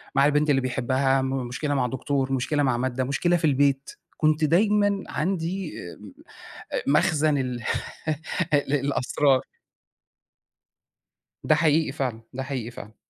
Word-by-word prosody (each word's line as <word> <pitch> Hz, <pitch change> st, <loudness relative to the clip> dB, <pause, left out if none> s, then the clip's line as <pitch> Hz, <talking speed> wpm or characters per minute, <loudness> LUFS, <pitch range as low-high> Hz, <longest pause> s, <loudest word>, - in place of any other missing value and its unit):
مع 140 Hz, -, +5 dB
البنت 150 Hz, +1 st, +2 dB
اللي 135 Hz, -2 st, +3 dB
بيحبها، 130 Hz, +1 st, +1 dB
مشكلة 130 Hz, +2 st, -2 dB
مع 130 Hz, -3 st, +1 dB
دكتور، 135 Hz, +1 st, -2 dB
مشكلة 145 Hz, +3 st, 0 dB
مع 130 Hz, -3 st, +1 dB
مادَّة، 130 Hz, +1 st, -1 dB
مشكلة 175 Hz, +7 st, +1 dB
في 160 Hz, -, -1 dB
البيت، 140 Hz, -1 st, +2 dB, 0.3 s
كنت 155 Hz, 0 st, +2 dB
دايمًا 205 Hz, +4 st, +3 dB
عندي 180 Hz, +1 st, -2 dB, 0.2 s
آآ، -, -, -13 dB, 0.9 s
مخزن 150 Hz, -1 st, +3 dB
ال 125 Hz, -3 st, -3 dB, 1.0 s
للأسرار. 140 Hz, -1 st, +1 dB, 2.0 s
ده 155 Hz, -, +4 dB
حقيقي 155 Hz, -1 st, +2 dB
فعلًا، 125 Hz, -5 st, -3 dB
ده 130 Hz, +1 st, -4 dB
حقيقي 130 Hz, -4 st, -4 dB
فعلًا. 110 Hz, -2 st, -11 dB
140 Hz, 120 wpm, -25 LUFS, 130-155 Hz, 2.0 s, مع